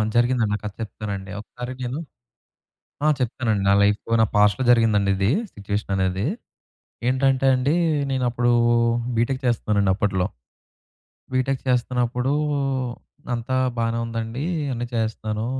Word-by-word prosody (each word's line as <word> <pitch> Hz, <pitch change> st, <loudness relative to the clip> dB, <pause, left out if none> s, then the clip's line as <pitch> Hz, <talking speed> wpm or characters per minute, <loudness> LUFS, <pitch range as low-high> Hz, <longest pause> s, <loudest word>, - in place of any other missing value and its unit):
జరిగిందండి. 120 Hz, -3 st, +2 dB
ఆ -, -, -16 dB
కథ 105 Hz, -, -4 dB
చెప్తానండి. 100 Hz, -3 st, -5 dB
ఒకసారి 125 Hz, +3 st, -7 dB
నేను 125 Hz, +4 st, -3 dB, 1.1 s
ఆ! -, -, +5 dB
చెప్తానండి. 115 Hz, -4 st, 0 dB
నా -, -, +6 dB
లైఫ్‌లో 105 Hz, +2 st, +1 dB
నా -, -, +6 dB
పాస్ట్‌లో 105 Hz, +5 st, +4 dB
జరిగిందండి 110 Hz, -4 st, +3 dB
ఇది 100 Hz, +3 st, +1 dB, 0.2 s
సిట్యుయేషననేది. 100 Hz, -1 st, -1 dB, 0.8 s
ఏంటంటే 130 Hz, +1 st, +2 dB
అండి, 130 Hz, +4 st, +1 dB, 0.4 s
నేనప్పుడు 120 Hz, -2 st, +1 dB, 0.6 s
బీటెక్ 130 Hz, +4 st, 0 dB
చేస్తున్నానండి 105 Hz, -5 st, +2 dB
అప్పట్లో. 95 Hz, -3 st, 0 dB, 1.1 s
బీటెక్ 130 Hz, +1 st, 0 dB
చేస్తున్నప్పుడూ, 125 Hz, +1 st, +1 dB, 1.0 s
అంతా 120 Hz, +2 st, -2 dB, 0.2 s
బానే 115 Hz, 0 st, 0 dB
ఉందండి, 115 Hz, +3 st, -4 dB, 0.3 s
అన్ని 120 Hz, 0 st, -3 dB
చేస్తున్నాను. 110 Hz, -1 st, -2 dB
115 Hz, 110 wpm, -23 LUFS, 105-125 Hz, 1.1 s, నా